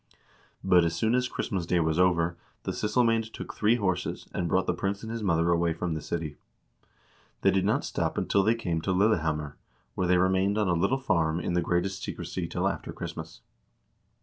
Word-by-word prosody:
But 90 -1 +5
as 85 0 0
soon 110 0 +1
as 125 0 +2
Christmas 95 -8 -3
day 90 - +2
was 80 0 +1
over, 85 -2 +3 0.3
the - - -2
syssel 105 +4 +1
mcBnd 115 -1 +1
took - - -7
three 110 +2 +3
horses, 95 -6 -2
and 85 - -1
brought - - +2
the - - +1
prince 100 +1 -3
and 110 - -5
his 115 0 -4
mother 85 -4 +2
away 85 -1 +2
from 85 +1 -3
the 80 - -3
city. 80 -4 -4 1.0
They - - +4
did 95 -1 +1
not - - +1
stop - - -2
until 100 - +2
they 110 +4 +3
came 85 -8 -2
to 95 - 0
Lille 105 +4 +4
hammer, 75 -2 -3 0.4
where 90 - -1
they 90 0 +4
remained 95 +3 +2
on 105 -2 +2
a 90 - +2
little 85 +10 +2
farm 85 -10 +1
in 85 - -2
the 90 - +2
greatest 90 +3 -1
secrecy - - -4
till - - -1
after - - -3
Christmas. - - -7
90 Hz, 205 wpm, -28 LUFS, 85-105 Hz, 1.0 s, But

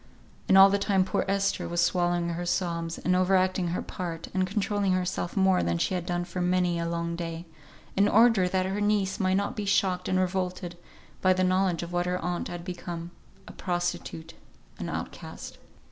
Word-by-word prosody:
And 190 - +6
all 195 0 +9
the 200 - +2
time 195 -2 +2
poor - - -1
Esther 195 0 0
was 175 0 -1
swallowing 175 0 +1
her 170 +1 -3
sobs, 170 -2 -1
and 180 - +1
over 185 +1 +3
acting 185 -1 +1
her 170 +2 -2
part, 170 -3 -6
and 185 0 +1
controlling 200 -1 0
herself 185 0 -2
more 190 -1 +4
than 85 0 0
she 135 - 0
had 180 -1 -3
done 175 -1 -1
for 180 0 -4
many 180 -1 +1
a 170 0 -2
long 170 0 -2
day, 165 0 -5 0.5
in 200 +1 +4
order 215 -3 +5
that 185 0 0
her 195 +2 -2
niece 205 -1 +1
might 190 -1 +2
not 200 0 -1
be 210 - -3
shocked 190 -2 +1
and 185 - +2
revolted, 185 -1 -2 0.5
by 185 0 +5
the 185 0 0
knowledge 185 -2 +1
of 170 +1 -7
what 175 0 0
her 180 0 0
aunt 180 -1 -3
had 175 -1 -7
become: 175 -2 -6 0.4
a - - -8
prostitute; 175 -2 -3 0.5
an - - -4
outcast. - - -7
180 Hz, 195 wpm, -27 LUFS, 175-190 Hz, 0.5 s, all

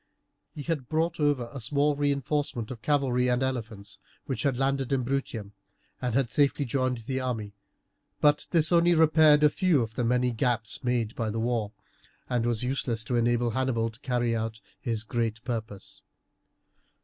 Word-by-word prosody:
He 145 - -6
had 150 -5 -3
brought 165 +2 0
over 145 -5 +1
a 135 - -6
small 145 +6 +1
reinforcement 140 -4 -1
of 115 -4 -8
cavalry 130 -3 +1
and 125 +1 +1
elephants, 110 -6 -4 0.3
which 135 -4 -3
had 140 -5 0
landed 135 0 0
in 135 -2 +1
Bruttium 120 -6 -3 0.5
and 125 -2 -1
had 130 -4 +1
safely 145 +3 +2
joined 130 0 0
the 130 +1 -2
army; 110 -6 -3 0.7
but 150 0 +3
this 160 -2 +2
only 170 0 +5
repaired 155 -2 +5
a 150 - +7
few 170 -9 +2
of 110 -1 -7
the 125 - -2
many 125 +1 +2
gaps 115 -1 -1
made 120 -3 0
by 115 -2 -2
the 110 +2 -3
war, 115 -3 -1 0.6
and 120 -2 0
was 120 -1 0
useless 125 -3 -1
to 120 +2 -2
enable 120 0 +2
Hannibal 115 -2 0
to 110 - -17
carry 120 -2 0
out 110 -1 -3 0.2
his 115 -2 0
great 115 0 -2
purpose. 110 -5 -5
125 Hz, 170 wpm, -27 LUFS, 115-140 Hz, 0.7 s, a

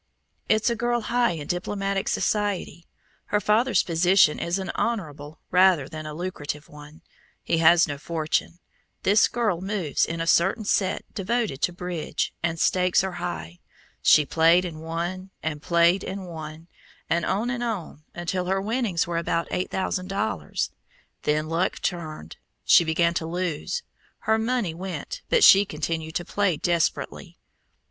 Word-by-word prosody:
"It's 220 +2 +3
a - - 0
girl 240 +1 0
high 240 -1 +1
in 155 -3 -6
diplomatic 195 +3 -2
society. 205 -5 -1 0.4
Her 210 - +1
father's 225 +5 +3
position 175 -1 +4
is 170 +2 -1
an 190 -2 -3
honorable 155 -9 -3
rather 180 -6 +4
than 155 0 -7
a 155 - -6
lucrative 150 -4 -5
one; 150 +1 -14 0.4
he 165 - 0
has 170 +1 +6
no 145 -2 -5
fortune. 160 +1 -2 0.5
This 205 +3 +5
girl 215 -8 -1
moves 190 -6 -1
in 165 0 -2
a 165 - -1
certain 190 +6 +2
set 190 -2 0
devoted 210 - -1
to - - +2
bridge, 175 -2 -3
and 165 0 -1
stakes 180 +1 +3
are 190 - -2
high. 85 - -5 0.4
She 150 - +6
played 165 +4 +4
and 160 -3 -7
won, 175 +4 -4
and 150 -2 -3
played 170 +3 +3
and 190 0 -5
won, 160 -1 -8 0.4
and 170 +1 +1
on 225 +5 0
and 245 -2 -3
on, 195 -9 -4
until 175 +1 -2
her 190 +1 0
winnings 215 -3 0
were 170 -1 -3
about 170 0 -1
eight 180 - -1
thousand 185 -1 -2
dollars. 200 +3 -2 0.5
Then 155 +1 0
luck 165 +4 -1
turned. 155 - -5 0.3
She - - +7
began 170 +1 +2
to 160 -1 -2
lose. 180 - -3 0.4
Her 220 0 +2
money 225 -6 -1
went, 190 - -6
but 475 - +4
she 195 +1 +9
continued 160 -3 -4
to 175 - -2
play 200 -4 0
desperately. 170 +1 -1
175 Hz, 155 wpm, -25 LUFS, 160-200 Hz, 0.5 s, she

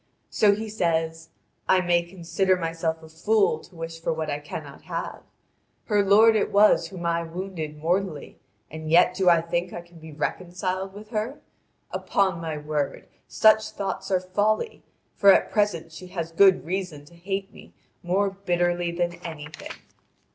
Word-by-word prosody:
So 205 -1 +4
he 220 +2 -5
says: 165 -5 -1 0.4
"I 185 -1 +5
may 175 -1 +3
consider 185 +2 0
myself 165 -1 -2
a - - -11
fool 440 - +2
to 180 - -17
wish 165 0 -7
for - - -1
what 160 -1 -2
I 145 - -2
cannot 150 - -8
have. - - -5 0.6
Her 205 -2 +2
lord 215 +3 +6
it 215 - +1
was 200 -4 +5
whom 175 0 -8
I 170 0 +1
wounded 165 -2 -6
mortally, 170 0 -2 0.3
and 155 0 -6
yet 175 +2 +5
do 185 -1 +3
I 170 -1 +5
think 170 +2 -2
I 175 - -5
can 170 -1 -17
be 160 0 -11
reconciled 185 +5 -3
with 210 +1 -11
her? 225 +6 -3 0.5
Upon 190 -4 0
my 160 -2 -4
word, 150 -1 -3 0.2
such 215 0 +4
thoughts 205 -2 -4
are 185 -2 +2
folly, 205 - -1 0.3
for 200 -1 +6
at - - +3
present 175 -6 0
she 180 +3 -10
has 170 -3 -5
good 190 +1 +5
reason 175 -5 -4
to 150 - -18
hate 195 +3 -4
me - - -14 0.3
more 195 +3 +1
bitterly 175 -2 0
than 175 0 -1
anything. 150 -2 -8
175 Hz, 165 wpm, -25 LUFS, 165-195 Hz, 0.6 s, lord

